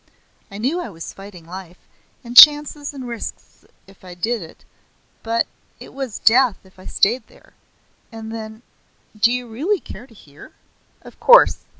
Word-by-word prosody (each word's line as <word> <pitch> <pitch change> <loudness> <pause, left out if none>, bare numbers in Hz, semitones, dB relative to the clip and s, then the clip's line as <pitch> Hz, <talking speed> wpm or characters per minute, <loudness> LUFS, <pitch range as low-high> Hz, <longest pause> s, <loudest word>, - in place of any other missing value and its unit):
I 200 - -10
knew 265 +11 -2
I 345 - -7
was 165 -4 -10
fighting 195 -4 -13
life 180 0 -11 0.5
and 240 0 -10
chances 295 +1 +7
and 265 -3 -9
risks 235 -1 -9 0.2
if 195 0 -21
I 180 -1 -11
did 225 +5 -3
it; 160 - -14 0.6
but 230 +1 -1 0.3
it - - -13
was 265 -5 -6
death 240 -1 +3
if 190 0 -23
I 185 - -12
stayed 225 +3 0
there. - - -23 0.6
And 225 0 -9
then 220 0 -9 0.5
Do 220 +3 +2
you 250 0 -3
really 310 - -2
care 250 - -12
to 240 - -21
hear?" 150 - -17 0.5
"Of - - -16
course. - - +5
225 Hz, 165 wpm, -19 LUFS, 195-260 Hz, 0.6 s, chances